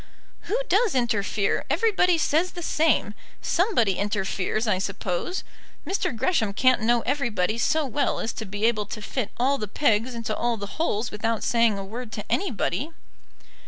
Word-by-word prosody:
"Who 460 - +1
does 420 - +3
interfere? 215 -4 +1
Everybody 360 +2 +3
says 325 +3 +1
the 350 - -6
same. 310 -10 +2 0.3
Somebody 330 - +1
interferes, 205 +1 -1
I 185 -3 +2
suppose. 195 - -3 0.4
Mr. 380 -10 -1
Gresham 225 - +1
can't 255 +2 +3
know 235 +1 +3
everybody 230 -6 0
so 310 +4 +2
well 275 +2 0
as 225 - -2
to 220 - -5
be 205 +2 -2
able 215 -3 +1
to 215 - -6
fit 235 0 -2
all 270 +3 +2
the 210 - -3
pegs 225 +1 +1
into 225 -2 -3
all 235 -1 0
the 200 +9 -6
holes 235 -7 0
without 225 +1 -1
saying 230 -3 +3
a 195 - -5
word 230 +3 -7
to 210 - -5
anybody." 315 - 0
235 Hz, 160 wpm, -25 LUFS, 210-290 Hz, 0.4 s, does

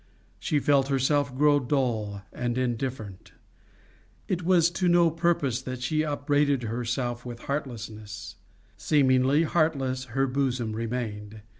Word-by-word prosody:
She 150 - 0
felt 140 -2 +3
herself 140 0 +1
grow 145 0 +4
dull 115 -7 -1
and 120 0 -2
indifferent. 120 -5 -4 0.9
It 180 -1 -1
was 175 -1 +3
to 180 +1 0
no 175 -1 +4
purpose 160 -7 0
that 130 -1 -6
she 155 +4 +1
upbraided 145 -2 +1
herself 120 +1 -2
with 120 -1 -8
heartlessness; 110 -7 -6 0.4
seemingly 135 +1 +3
heartless 140 -6 0
her 135 +3 0
bosom 125 -4 -1
remained. 110 -2 -4
130 Hz, 120 wpm, -27 LUFS, 120-145 Hz, 0.9 s, grow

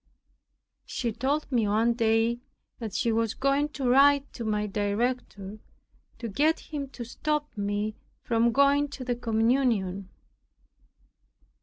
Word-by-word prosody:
She 235 -2 -2
told 280 +7 -1
me 230 -4 +2
one 225 +3 +2
day 230 0 +2 0.4
that 225 -5 -5
she 235 - +1
was 225 -1 0
going 275 +2 +1
to 265 -3 -2
write 280 +2 +5
to 235 - -6
my 210 -1 0
director 205 0 -2 0.6
to 235 - -5
get 300 +10 +2
him 285 -3 -6
to 245 -3 -7
stop 300 +5 -2
me 205 +1 -2 0.3
from 235 0 +2
going 280 +3 +4
to 275 -2 -8
the 245 -1 0
communion. 225 -5 +1
235 Hz, 130 wpm, -27 LUFS, 215-275 Hz, 0.6 s, write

